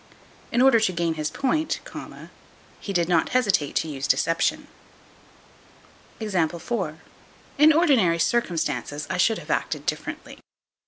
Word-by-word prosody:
In 240 +2 +3
order 265 -4 +6
to 220 -4 +1
gain 170 -2 -1
his 155 -1 -3
point, 310 +4 -1 1.0
he 200 - -6
did 175 -3 +1
not 170 -3 +2
hesitate 195 - +1
to - - 0
use 135 -3 -4
deception. 165 0 +1 1.5
In 190 -8 0 1.2
ordinary 270 - +3
circumstances 165 -7 -1
I 185 - -1
should 215 +5 +3
have - - -7
acted - - -2
differently. - - -5
180 Hz, 115 wpm, -24 LUFS, 165-235 Hz, 1.5 s, order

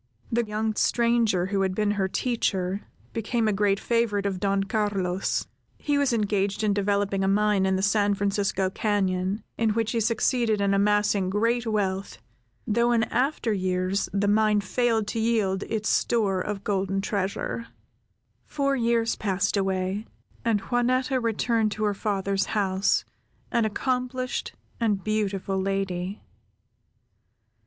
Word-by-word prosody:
The 235 +1 +2
young 215 0 -2
stranger 235 -5 +2
who 195 0 -1
had 190 -1 0
been 210 0 +1
her 200 -2 0
teacher, 195 -4 -1 0.3
became 230 0 0
a 215 - +2
great 200 0 +2
favorite 230 -4 0
with 195 -2 -1
Don 195 0 +1
Carlos. 195 -3 -1 0.3
He 290 - -1
was 280 -2 +2
engaged 205 -2 0
in 210 -1 +2
developing 200 -1 0
a - - +1
mine, 205 -1 +2
in 190 - +2
the 190 - -1
San 205 0 +2
Francisco 200 -1 0
cañon, 190 -1 0 0.2
in 220 -2 +2
which 225 -1 0
he 235 - 0
succeeded 230 0 +1
in 200 0 +2
amassing 205 -1 +2
great 230 +4 +1
wealth, 195 -3 -1 0.5
though 235 +3 +2
in 230 -2 +3
after 250 -3 +1
years 185 0 -1
the 200 +1 0
mine 210 0 +3
failed 225 +2 +1
to 230 - -2
yield 215 -4 +1
its 215 -2 -1
store 200 -6 +1
of 200 0 -4
golden 195 -1 0
treasure. 200 +3 -2 0.8
Four 275 -2 0
years 230 -2 +1
passed 195 -1 0
away, 190 +1 -1 0.4
and 225 -3 +1
Juanetta 255 +3 +1
returned 230 -1 +1
to 215 - -4
her 205 -1 +2
father's 195 -1 -1
house, 190 -1 +1 0.5
an 235 -1 +2
accomplished, 255 +3 -2 0.3
and 210 -5 0
beautiful 200 -3 -1
lady. 195 0 -2
205 Hz, 140 wpm, -26 LUFS, 195-230 Hz, 0.8 s, in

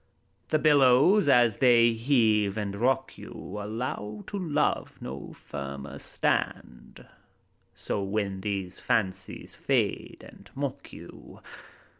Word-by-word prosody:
The 155 - +3
billows, 150 +6 +5
as 120 -5 +4
they 120 -3 +5
heave 110 -4 +2
and 100 -2 -3
rock 130 +4 0
you, 105 - -8
Allow 105 -1 -5
to 200 - -5
love 150 -5 -1
no 65 +2 -7
firmer 70 0 -7
stand, - - -3 0.7
So, 100 - -3
when 100 -1 -2
these 95 -2 -4
fancies 95 -3 -2
fade - - -1
and - - -16
mock - - -5
you. - - -13
110 Hz, 110 wpm, -27 LUFS, 100-130 Hz, 0.7 s, billows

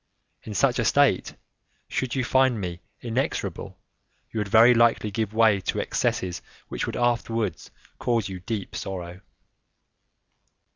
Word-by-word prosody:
In 105 - -8
such - - +2
a - - +2
state, - - +2 0.5
should 130 -1 -2
you 130 - 0
find 130 -2 +3
me 90 -3 -5 0.2
inexorable, 120 +2 -3 0.5
you 110 - -3
would 105 - -1
very 115 +4 +7
likely 115 -2 +3
give 110 -1 -2
way 110 -2 +4
to - - -2
excesses 90 -2 -1 0.3
which - - -3
would - - -4
afterwards 115 -5 -1 0.3
cause 115 -4 0
you 95 -2 -6
deep 100 +2 -5
sorrow." 90 -1 -6
110 Hz, 135 wpm, -25 LUFS, 95-120 Hz, 0.5 s, very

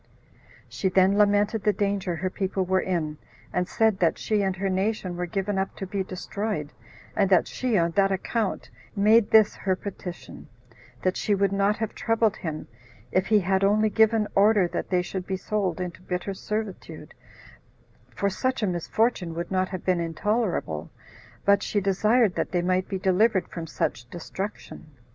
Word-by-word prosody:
She 190 - -1
then 190 +1 +4
lamented 205 +1 +3
the 210 - +3
danger 200 -3 -1
her 185 +3 -3
people 190 -1 -1
were 185 +1 +2
in; 155 -5 -2 0.3
and 180 0 0
said 220 -3 +2
that 170 -3 +2
"she 215 -2 0
and 190 -1 0
her 195 +1 -2
nation 190 -1 -1
were 180 0 -3
given 195 +2 -1
up 190 - -2
to 195 - -5
be 190 +1 -2
destroyed, 185 -3 -4 0.4
and 195 -2 +2
that 185 -3 +4
she, 250 -4 -1
on 170 -1 +2
that 195 +2 +2
account, 200 +2 -2 0.2
made 215 +2 +4
this 220 -1 +6
her 190 -1 0
petition; 185 -3 -8 0.6
that 185 0 +1
she 210 - +1
would 195 0 +1
not 200 +1 +1
have 220 -1 -3
troubled 225 -2 +1
him 155 -4 -5 0.4
if 185 +1 +1
he 215 -2 +4
had 190 +1 +1
only 215 +2 +3
given 220 0 +3
order 205 -2 +4
that - - -4
they 180 -1 +2
should 185 0 -5
be 190 - -2
sold 195 -3 -2
into 180 -1 -5
bitter 180 +2 -3
servitude, 210 0 -5 1.0
for 200 - -2
such 255 +6 -1
a - - +4
misfortune 180 0 0
would 170 +2 -4
not 185 0 +1
have 185 -2 -6
been 185 -2 +2
intolerable; 170 - -1 0.6
but 200 0 +5
she 205 - 0
desired 210 +2 +2
that - - -2
they 175 -1 0
might 185 +1 0
be 195 - -2
delivered 190 +1 +2
from 165 -2 -6
such 120 -5 -3
destruction." 185 +1 -7
195 Hz, 175 wpm, -26 LUFS, 180-210 Hz, 1.0 s, this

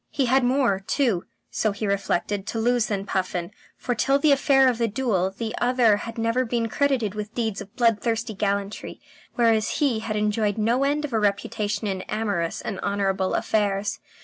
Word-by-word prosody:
He 275 - 0
had 260 +2 +3
more 245 -5 +2
too, 205 -2 0 0.3
so 215 - 0
he 205 +2 -4
reflected, 200 0 -1
to 225 - -3
lose 240 0 +2
than 200 -2 -2
Puffin, 185 -3 -2 0.3
for 245 - -2
till 275 +4 +2
the 295 +1 +3
affair 270 -1 +4
of 245 -2 +1
the 230 - +2
duel 205 -5 0
the 220 +3 -5
other 245 -4 +4
had 230 +3 -7
never 230 +3 +1
been 230 -1 -1
credited 260 -6 +1
with 210 0 -6
deeds 220 -4 -2
of 200 0 -12
bloodthirsty 230 -1 +1
gallantry, 200 0 -3 0.4
whereas 225 -3 +2
he 270 -7 +1
had 220 -1 -4
enjoyed 210 0 0
no 230 +5 +2
end 295 +2 +1
of 275 - -7
a 220 - +2
reputation 205 +1 -1
in 190 -2 -2
amorous 205 -6 -1
and 200 - -5
honourable 195 -2 0
affairs. 205 -1 0
220 Hz, 180 wpm, -24 LUFS, 200-245 Hz, 0.4 s, affair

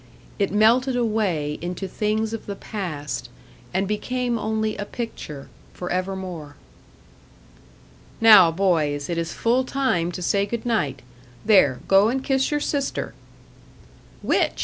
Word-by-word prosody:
It 200 - +1
melted 235 +5 +3
away 205 -11 0
into 180 +3 -4
things 215 +3 -1
of 225 - -6
the 200 - -4
past, 150 - -5 0.4
and 190 +2 0
became 240 +3 -1
only 220 0 -1
a 205 - -4
picture, 205 - -7 0.3
for 180 - -5
evermore. 185 -5 -4 1.6
"Now, 210 -7 +8
boys 160 -4 0
it 170 - -1
is 165 0 -3
full 245 +3 +1
time 255 -11 0
to 180 - -5
say 200 +2 +1
good 235 +2 -4
night. 145 - -1 0.4
There, 170 - +4
go 195 +2 +5
and 265 +2 -1
kiss 265 -1 +1
your 295 - 0
sister." 285 -2 -2 1.1
"Which?" - - +1
200 Hz, 130 wpm, -23 LUFS, 170-230 Hz, 1.6 s, Now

